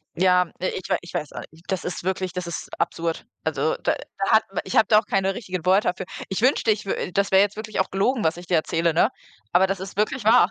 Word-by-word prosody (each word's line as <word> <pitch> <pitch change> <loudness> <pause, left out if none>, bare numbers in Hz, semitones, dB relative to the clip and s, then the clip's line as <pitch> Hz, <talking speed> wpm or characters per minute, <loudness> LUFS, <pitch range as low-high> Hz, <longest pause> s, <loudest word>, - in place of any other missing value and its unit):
ja, 180 -1 +3
ich 185 0 -3
äh, - - +3
ich 170 - -12
weiß 150 - -3
auch - - -6
nicht, 160 +2 -20
das 190 - -1
ist 180 - -4
wirklich 185 -1 -1
das 180 -1 -5
ist 170 - -5
absurd. 165 -1 -2 0.2
Also 160 0 0
da - - +2
da 195 - -5
hat 220 0 +6
m 195 - -2
ich 190 - -5
habe - - +6
da 215 -1 +6
auch 220 - -7
keine 195 -1 0
richtigen 185 -7 -5
Worte 190 +3 +4
dafür. 185 +1 -4 0.2
Ich 190 - -2
wünschte, 245 -3 +3
ich 210 -1 -2
w - - -2
äh, - - -4
das 200 +2 0
wäre 190 - +7
jetzt 205 0 +1
wirklich 215 0 -4
auch - - -3
gelogen, 220 +5 +1
was 160 +1 +1
ich 175 0 -10
dir 180 - +2
erzähle, 165 +1 +1
ne? 170 +7 +4 0.4
Aber 185 +2 +4
das 195 0 -2
ist 195 0 -8
wirklich 215 +4 0
wahr. 220 -3 +6
190 Hz, 270 wpm, -24 LUFS, 175-205 Hz, 0.4 s, wäre